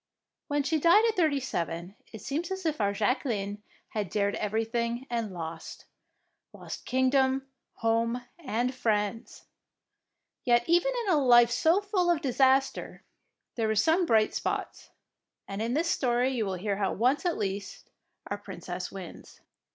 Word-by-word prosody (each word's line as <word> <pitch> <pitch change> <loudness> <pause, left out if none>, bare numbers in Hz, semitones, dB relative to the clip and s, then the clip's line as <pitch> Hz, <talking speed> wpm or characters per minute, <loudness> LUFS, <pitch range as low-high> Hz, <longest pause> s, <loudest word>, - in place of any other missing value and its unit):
When 290 0 0
she 315 +2 0
died 345 +8 +6
at 445 - 0
thirty 310 -6 +2
seven, 175 -7 -4 0.2
it 220 - -9
seems 305 - -3
as 380 -1 -5
if 305 -6 0
our 200 -1 +2
Jacqueline 205 -2 -1 0.3
had 210 -4 -3
dared 200 +1 0
everything 235 +3 -2
and 230 -3 -2
lost, 165 -2 -7 0.3
— - - -50
lost - - -8
kingdom, 265 +1 +2 0.3
home, 230 +2 0
and 250 -4 -1
friends. 220 -3 -2 1.0
Yet 240 -1 +3
even 350 +9 +3
in 380 - +2
a - - +4
life 240 -2 +6
so 330 +10 +3
full 390 -3 0
of 340 -3 +3
disaster 270 -1 +1 0.5
there 225 -2 -1
were 220 - +1
some 325 - +3
bright 220 -4 +3
spots, - - -3 0.6
and 195 +1 -5
in 235 +3 -1
this 335 +3 +1
story 250 0 +1
you 230 -5 -1
will 190 - -2
hear 200 +2 -2
how 195 -2 0
once 255 +7 +1
at 350 -2 0
least 200 -1 -5 0.3
our 205 - -4
Princess 180 -2 -6
wins. 190 -4 -10
240 Hz, 155 wpm, -28 LUFS, 205-285 Hz, 1.0 s, died